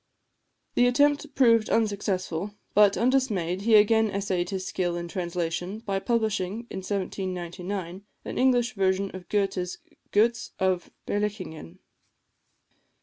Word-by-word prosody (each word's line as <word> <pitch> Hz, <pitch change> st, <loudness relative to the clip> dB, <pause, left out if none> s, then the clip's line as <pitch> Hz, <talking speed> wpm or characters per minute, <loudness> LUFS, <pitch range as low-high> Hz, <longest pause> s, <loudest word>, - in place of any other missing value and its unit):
The 245 Hz, -, +4 dB
attempt 290 Hz, +3 st, +2 dB
proved 230 Hz, -4 st, +4 dB
unsuccessful; 200 Hz, -3 st, -1 dB, 0.2 s
but, 205 Hz, -1 st, +5 dB
undismayed, 220 Hz, -9 st, +1 dB
he 220 Hz, +1 st, +4 dB
again 220 Hz, +1 st, +5 dB
essayed 190 Hz, -3 st, -1 dB
his 190 Hz, -1 st, -3 dB
skill 175 Hz, -2 st, -1 dB
in 170 Hz, 0 st, -4 dB
translation 175 Hz, +2 st, -3 dB
by 200 Hz, -3 st, -2 dB
publishing, 220 Hz, -1 st, -1 dB
in 190 Hz, -, -4 dB
1799, 185 Hz, -1 st, -4 dB, 0.2 s
an -, -, -5 dB
English 245 Hz, -2 st, +3 dB
version 195 Hz, -1 st, +1 dB
of 180 Hz, -2 st, -10 dB
Goëthe's 195 Hz, -3 st, -1 dB, 0.3 s
"Goetz 225 Hz, +2 st, +2 dB
of 185 Hz, -2 st, 0 dB, 0.2 s
Berlichingen." 205 Hz, -, -4 dB
200 Hz, 115 wpm, -26 LUFS, 185-220 Hz, 0.3 s, but